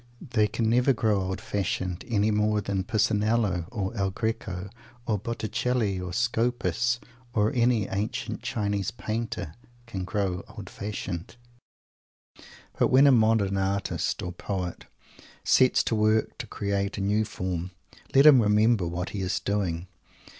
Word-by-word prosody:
They 110 -3 +3
can 110 +2 -1
never 125 +4 +4
grow 110 -4 +1
old 95 0 -3
fashioned; 95 -2 -2
any 110 -2 +2
more 105 0 +2
than 100 -2 -2
Pisanello, 105 -4 +1
or 105 -1 -3
El 95 -3 0
Greco, 95 -3 -3 0.4
or 105 -3 0
Botticelli, 115 -1 -1
or 90 -1 -5
Scopas, 120 +2 0 0.4
or 105 -1 +2
any 120 -4 +2
ancient 100 +3 -3
Chinese 100 -3 -1
Painter, 110 -8 -4 0.3
can 100 -6 -5
grow 95 -1 -2
old - - -8
fashioned. 100 -3 -5 1.4
But - - +5
when 130 +2 +6
a 140 - +7
modern 110 -5 +3
artist 95 0 -1
or 90 - -3
poet 90 0 -4 0.6
sets 130 -1 +4
to - - -1
work 110 0 +2
to - - -5
create 100 0 -2
a - - -2
new 105 +2 +2
form, 90 -3 -4 0.5
let 135 +2 +7
him 140 -5 +9
remember 105 -2 +3
what 90 +2 -3
he 100 - -4
is 95 0 -1
doing! 95 -4 -1
105 Hz, 140 wpm, -27 LUFS, 95-115 Hz, 1.4 s, him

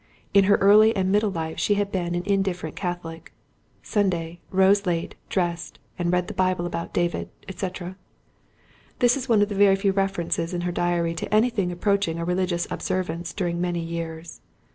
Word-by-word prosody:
In 200 -1 +6
her 205 +1 +5
early 215 +3 +6
and 190 -1 +1
middle 210 +1 +3
life 160 -3 -4
she 205 - +2
had 200 0 -1
been 175 -2 -2
an 175 - -2
indifferent 195 -5 -1
Catholic: 170 -3 -5 0.5
"Sunday. 175 -5 -1
Rose 195 +1 +3
late, 170 -1 -1 0.2
dressed, 175 -2 -2 0.2
and 175 -1 0
read 180 0 +2
in - - -14
the - - -5
Bible 185 -2 0
about 170 -1 -4
David, 175 0 -1 0.3
&c."—this 190 +6 -5
is 265 -2 -5
one 215 -3 +5
of 205 - -1
the - - -3
very 200 -1 +5
few 195 0 +1
references 185 -3 -1
in 175 - -2
her 175 0 -1
diary 175 -1 0
to 160 - -5
anything 215 -4 +2
approaching 195 -2 0
a 170 - -3
religious 180 -1 0
observance 170 -2 -3
during 175 -1 -2
many 175 -1 -1
years. 165 0 -6
180 Hz, 175 wpm, -24 LUFS, 170-200 Hz, 0.5 s, In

